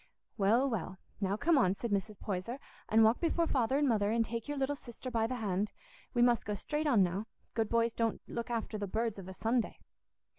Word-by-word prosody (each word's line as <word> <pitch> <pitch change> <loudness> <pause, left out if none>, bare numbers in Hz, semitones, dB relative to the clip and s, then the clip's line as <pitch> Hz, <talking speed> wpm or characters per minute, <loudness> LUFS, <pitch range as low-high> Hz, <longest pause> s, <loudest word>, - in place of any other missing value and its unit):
"Well, 225 +6 +3
well, 190 -6 -3 0.2
now 200 0 0
come 325 +4 +4
on," 190 -6 +3
said 235 +2 -4
Mrs. 205 +1 -1
Poyser, 200 +5 -3 0.3
"and 220 +1 +6
walk 220 +2 +4
before 335 0 +2
Father 260 -3 +1
and 290 0 +3
Mother, 210 -4 +2
and 230 +1 +2
take 230 0 -4
your 290 0 -3
little 275 +1 0
sister 255 -1 -8
by 225 -2 +1
the 255 - -2
hand. 205 -3 -1 0.4
We 240 - +5
must 240 -2 +4
go 210 - -2
straight 300 +9 -2
on 230 -9 +5
now. 190 +5 -1 0.3
Good 225 -2 0
boys 230 0 +2
don't 230 -1 0
look 235 0 -4
after 225 -2 -2
the 205 - -2
birds 220 +1 -1
of 185 - -9
a 190 - -7
Sunday." 230 +3 0
225 Hz, 220 wpm, -33 LUFS, 205-245 Hz, 0.4 s, and